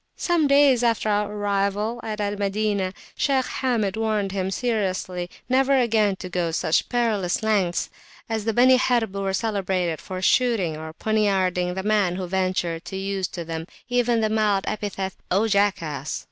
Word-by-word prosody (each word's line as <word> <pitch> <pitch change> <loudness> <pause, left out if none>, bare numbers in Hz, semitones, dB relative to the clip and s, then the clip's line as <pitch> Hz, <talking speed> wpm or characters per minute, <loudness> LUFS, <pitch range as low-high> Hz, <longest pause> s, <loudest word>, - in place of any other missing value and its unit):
Some 340 -4 +2
days 280 -3 +5
after 230 -2 +1
our 210 0 +1
arrival 205 +2 -1
at 215 -2 -5
Al 205 0 -1
Madinah, 200 -1 -1 0.2
Shaykh 270 -3 +1 0.2
Hamid 225 -7 0
warned 215 -3 0
him 190 -1 -2
seriously 185 -5 -2 0.2
never 270 +2 +3
again 220 -5 +2
to 185 - -7
go 175 -2 -1
such 160 0 0
perilous 220 -7 0
lengths, 200 -5 +1 0.4
as 225 -2 -2
the 225 - +2
Beni 255 +3 +5
Harb 240 -5 +1
were 195 -1 -1
celebrated 190 -5 -1
for 185 -1 -6
shooting 220 -9 +2
or 160 +1 -7
poniarding 190 -4 +1
the 190 - -3
man 205 -4 +2
who 185 0 -3
ventured 180 -2 -1
to 190 - -5
use 195 -1 -2
to 170 -2 -7
them 165 0 -5 0.2
even 245 -2 +2
the 215 - +1
mild 210 -3 +2
epithet 195 -3 -3 0.2
"O 200 +5 +2
jackass!" 170 -9 0
205 Hz, 160 wpm, -24 LUFS, 185-225 Hz, 0.4 s, days